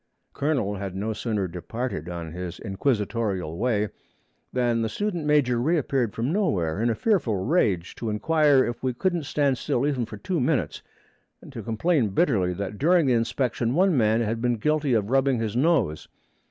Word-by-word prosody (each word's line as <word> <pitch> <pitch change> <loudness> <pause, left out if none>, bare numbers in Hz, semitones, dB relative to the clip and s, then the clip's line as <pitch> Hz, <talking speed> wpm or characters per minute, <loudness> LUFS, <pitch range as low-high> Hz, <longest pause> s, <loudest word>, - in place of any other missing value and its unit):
Colonel 130 -9 -1
had 95 -1 -5
no 105 +3 -2
sooner 105 -3 -2
departed 90 0 -5
on 85 -2 -6
his 90 0 -6
inquisitorial 105 - -1
way 105 -3 +1 0.6
than 120 -2 +1
the 110 - -1
student 180 - -2
major 135 -5 +3
reappeared 135 -6 0
from 120 +7 -1
nowhere, 95 - 0
in 120 - +2
a 115 - +1
fearful 175 - +1
rage, 105 - +1
to 115 - -3
inquire 145 +5 +3
if 120 0 -5
we 130 -2 -1
couldn't 175 0 -1
stand 140 -4 +1
still 125 - 0
even 130 -6 -1
for 105 - -8
two 170 - -2
minutes, 140 +2 0 0.6
and - - -14
to - - -6
complain 120 +2 +1
bitterly 100 - +2
that 100 +3 -5
during 170 +2 +4
the 130 - +3
inspection 120 +1 0
one 185 0 +3
man 110 -2 +3
had 115 0 -2
been 120 0 +1
guilty 150 +2 +1
of 105 0 0
rubbing 135 -1 +3
his 110 -1 -3
nose. 125 - +1
120 Hz, 175 wpm, -25 LUFS, 105-145 Hz, 0.6 s, during